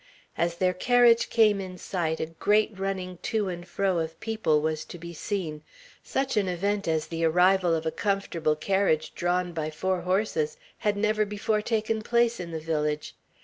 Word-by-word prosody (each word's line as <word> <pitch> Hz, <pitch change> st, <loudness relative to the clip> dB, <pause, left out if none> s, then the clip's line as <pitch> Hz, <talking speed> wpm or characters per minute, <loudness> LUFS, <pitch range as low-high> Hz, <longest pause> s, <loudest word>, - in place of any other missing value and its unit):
As 170 Hz, 0 st, 0 dB
their 180 Hz, +1 st, +1 dB
carriage 240 Hz, +3 st, +4 dB
came 210 Hz, -3 st, +4 dB
in 185 Hz, -1 st, -7 dB
sight, 165 Hz, -4 st, -2 dB
a -, -, 0 dB
great 205 Hz, +7 st, +1 dB
running 185 Hz, -2 st, -3 dB
to 215 Hz, -3 st, -1 dB
and 175 Hz, 0 st, -6 dB
fro 190 Hz, -3 st, 0 dB
of 160 Hz, 0 st, -4 dB
people 220 Hz, -9 st, +1 dB
was 155 Hz, 0 st, -1 dB
to -, -, -9 dB
be 170 Hz, 0 st, -8 dB
seen. 165 Hz, -3 st, -3 dB, 0.4 s
Such 270 Hz, -3 st, -1 dB
an 200 Hz, -2 st, +2 dB
event 200 Hz, +3 st, -1 dB
as 160 Hz, -1 st, +1 dB
the 165 Hz, 0 st, -4 dB
arrival 180 Hz, +1 st, +4 dB
of 160 Hz, 0 st, -3 dB
a 160 Hz, -, 0 dB
comfortable 180 Hz, -6 st, 0 dB
carriage 160 Hz, -2 st, +1 dB
drawn 175 Hz, 0 st, 0 dB
by 155 Hz, -2 st, -2 dB
four 185 Hz, +4 st, -1 dB
horses 220 Hz, -, 0 dB, 0.2 s
had 210 Hz, -2 st, 0 dB
never 215 Hz, +1 st, +2 dB
before 210 Hz, +1 st, -1 dB
taken 220 Hz, 0 st, -1 dB
place 235 Hz, +1 st, +2 dB
in 175 Hz, -1 st, -5 dB
the 160 Hz, -1 st, -4 dB
village. 150 Hz, -1 st, -2 dB
185 Hz, 180 wpm, -27 LUFS, 165-210 Hz, 0.4 s, carriage